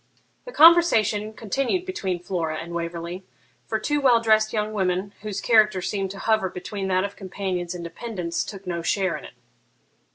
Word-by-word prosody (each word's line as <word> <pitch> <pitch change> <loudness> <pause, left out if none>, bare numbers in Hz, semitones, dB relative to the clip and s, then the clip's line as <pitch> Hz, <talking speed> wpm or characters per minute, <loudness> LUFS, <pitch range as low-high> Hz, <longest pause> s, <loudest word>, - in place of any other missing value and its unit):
The - - -8
conversation 230 - +5
continued 270 - -1
between 190 - -3
Flora 165 -4 -2
and 170 +2 -7
Waverley; 170 +2 -5 0.4
for 220 - 0
two 295 +7 -1
well 250 -4 +5
dressed 215 -1 +3
young 215 0 -2
women, 190 0 -1
whose 210 -2 -4
character 215 -4 +4
seemed 195 +1 -2
to 195 - -8
hover 215 -2 +1
between 195 +2 -5
that 185 0 +2
of 200 0 -4
companions 185 -2 -4
and 175 - -6
dependants, 175 -2 -4
took 195 -2 -9
no 170 -2 -3
share 185 +1 0
in - - -8
it. - - -12
200 Hz, 170 wpm, -24 LUFS, 180-220 Hz, 0.4 s, conversation